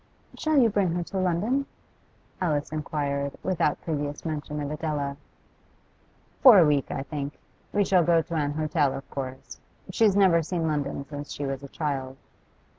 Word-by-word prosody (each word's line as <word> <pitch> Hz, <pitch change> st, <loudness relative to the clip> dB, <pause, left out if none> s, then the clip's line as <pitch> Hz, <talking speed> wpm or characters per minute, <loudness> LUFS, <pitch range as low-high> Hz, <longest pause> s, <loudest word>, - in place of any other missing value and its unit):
'Shall 310 Hz, -1 st, +1 dB
you 250 Hz, -4 st, +6 dB
bring 200 Hz, -5 st, +1 dB
her 175 Hz, -, -1 dB
to 190 Hz, +3 st, -4 dB
London?' 205 Hz, +10 st, 0 dB, 0.7 s
Alice 150 Hz, -5 st, 0 dB
inquired, 140 Hz, -2 st, -2 dB
without 170 Hz, -5 st, +1 dB
previous 145 Hz, -2 st, -3 dB
mention 150 Hz, -1 st, -3 dB
of 145 Hz, 0 st, -3 dB
Adela. 150 Hz, -3 st, -2 dB, 1.3 s
'For 250 Hz, -6 st, +10 dB
a 175 Hz, -, +7 dB
week, 145 Hz, -2 st, +1 dB
I -, -, -3 dB
think. 140 Hz, +1 st, -5 dB, 0.3 s
We 205 Hz, -1 st, +2 dB
shall 185 Hz, -3 st, +4 dB
go 165 Hz, 0 st, +3 dB
to 170 Hz, -, -8 dB
an 145 Hz, -3 st, 0 dB
hotel, 155 Hz, -2 st, +1 dB
of 135 Hz, -, -8 dB
course. 130 Hz, -1 st, -6 dB, 0.3 s
She's 205 Hz, 0 st, +3 dB
never 185 Hz, -4 st, +5 dB
seen 165 Hz, +1 st, -2 dB
London 145 Hz, -2 st, -2 dB
since 145 Hz, 0 st, -7 dB
she 145 Hz, -, -4 dB
was 135 Hz, -1 st, -3 dB
a 140 Hz, -, -8 dB
child. 135 Hz, -3 st, -3 dB
155 Hz, 165 wpm, -26 LUFS, 145-175 Hz, 1.3 s, For